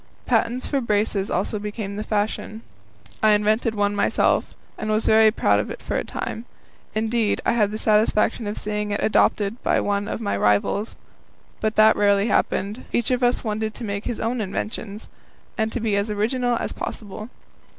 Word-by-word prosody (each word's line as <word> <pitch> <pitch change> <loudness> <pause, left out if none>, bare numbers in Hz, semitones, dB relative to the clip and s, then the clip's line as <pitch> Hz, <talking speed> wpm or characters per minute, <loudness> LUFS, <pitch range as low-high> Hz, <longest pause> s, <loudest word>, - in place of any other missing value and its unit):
Patents 240 +2 +1
for 280 -2 0
braces 210 -3 0
also 200 +3 -1
became 205 -1 -5
the 210 - -3
fashion. 215 +1 -2 0.6
I 215 -1 +5
invented 215 +2 +1
one 205 0 +1
myself, 205 - +1 0.2
and 215 - -5
was 215 +1 +1
very 220 0 +6
proud 215 - +2
of - - -3
it - - -6
for - - -4
a - - 0
time 225 - -5 0.5
indeed, 220 0 +1
I - - +3
had 215 -4 +2
the 215 - -4
satisfaction 215 0 +2
of 205 - -4
seeing 210 0 -3
it 205 - -2
adopted 210 +1 +2
by - - +2
one 205 0 -1
of - - -3
my 215 - -1
rivals. 105 - +1 0.6
But 215 0 -1
that 215 0 +6
rarely 200 +1 +3
happened; 210 +3 0
each 240 +1 0
of 250 0 +1
us 245 0 +2
wanted 215 -1 -2
to 245 - -6
make 200 -1 -4
his 235 - -3
own 230 +1 -1
inventions, 210 +1 -5 0.5
and 220 0 -1
to 245 - -3
be 220 -3 0
as 200 +2 0
original 240 +4 0
as - - -3
possible. 215 +1 -6
215 Hz, 180 wpm, -23 LUFS, 205-225 Hz, 0.6 s, very